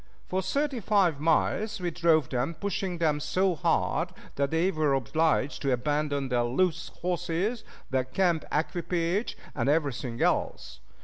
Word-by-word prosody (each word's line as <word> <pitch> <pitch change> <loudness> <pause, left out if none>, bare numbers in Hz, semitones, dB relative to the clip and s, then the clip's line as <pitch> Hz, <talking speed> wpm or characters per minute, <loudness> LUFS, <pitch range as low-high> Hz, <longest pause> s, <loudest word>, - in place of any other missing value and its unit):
For 190 +1 -1
thirty 280 +4 -1
five 195 -8 +2
miles 165 +7 +1
we 175 -1 -2
drove 160 -4 +3
them, 130 +6 -1
pushing 195 -1 -2
them 155 -3 +1
so 185 +5 +1
hard 155 - +1 0.2
that 140 0 0
they 165 +5 +2
were 155 -5 +2
obliged 150 +3 +1
to 140 - +1
abandon 145 +1 0
their 125 -1 +2
loose 165 +7 0 0.2
horses, 180 +6 -1 0.3
their 130 -1 +1
camp 170 +3 +1
equipage, 170 +5 -1 0.2
and - - 0
everything 140 -6 0
else. - - 0
165 Hz, 140 wpm, -28 LUFS, 140-180 Hz, 0.3 s, drove